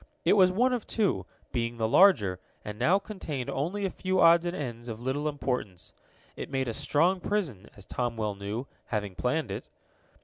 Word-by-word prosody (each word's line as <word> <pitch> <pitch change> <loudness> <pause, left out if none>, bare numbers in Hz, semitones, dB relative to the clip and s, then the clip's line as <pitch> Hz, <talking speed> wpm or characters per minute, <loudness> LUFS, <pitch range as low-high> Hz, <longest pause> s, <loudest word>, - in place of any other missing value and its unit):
It - - +5
was 185 -3 +6
one 250 +7 +2
of 240 -4 -3
two, 215 -4 0 0.2
being 115 -1 -2
the 110 -1 +1
larger, 110 - +5 0.3
and 105 0 -6
now 170 +11 +4
contained 175 - -5
only 180 +9 -2
a 190 - -1
few 185 0 -1
odds 170 +1 +6
and 175 - -2
ends 120 -4 -5
of 115 -2 -5
little 135 +5 -1
importance. 125 - -4 0.4
It - - -6
made 130 -1 -1
a 115 - -2
strong 170 - +2
prison, 170 - -2
as 100 - -12
Tom 120 +1 -2
well 105 -2 -1
knew, 100 +5 -4 0.2
having 105 -3 -2
planned 125 - -1
it. 100 - -6
135 Hz, 190 wpm, -28 LUFS, 115-185 Hz, 0.4 s, was